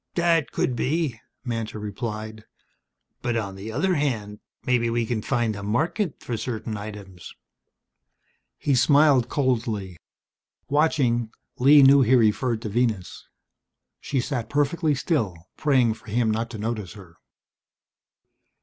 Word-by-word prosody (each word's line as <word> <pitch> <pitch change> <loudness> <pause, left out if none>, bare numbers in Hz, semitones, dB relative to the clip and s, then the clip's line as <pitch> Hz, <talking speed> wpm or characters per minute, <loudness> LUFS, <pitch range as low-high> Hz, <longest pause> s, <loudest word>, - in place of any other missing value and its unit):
"That 170 -3 +2
could 125 - -1
be," 140 -1 -1 0.3
Mantor 115 -3 -3
replied. 110 +1 -6 0.8
"But 120 -1 -1
on 100 -3 -3
the 100 +3 -7
other 165 +11 +1
hand, 115 -9 -2 0.3
maybe 120 -2 +2
we 115 0 0
can 110 -1 -2
find 120 -3 0
a 100 - -7
market 155 - -1
for 120 - -3
certain 110 -2 -4
items." 100 -4 -9 1.2
He 145 - 0
smiled 140 0 +4
coldly. 115 - -1 0.7
Watching, 135 -6 +1 0.3
Lee 140 +3 +7
knew 140 +1 +7
he 130 +1 +4
referred 115 0 +2
to 110 - -3
Venus. 110 -4 -2 0.7
She 135 - -2
sat 125 -2 -3
perfectly 145 +2 +1
still, 130 - -1 0.2
praying 130 -6 +2
for 110 - -18
him 110 +1 +1
not 115 +2 -2
to 115 - -7
notice 105 -3 -4
her. 90 -5 -14
120 Hz, 130 wpm, -24 LUFS, 110-140 Hz, 1.2 s, Lee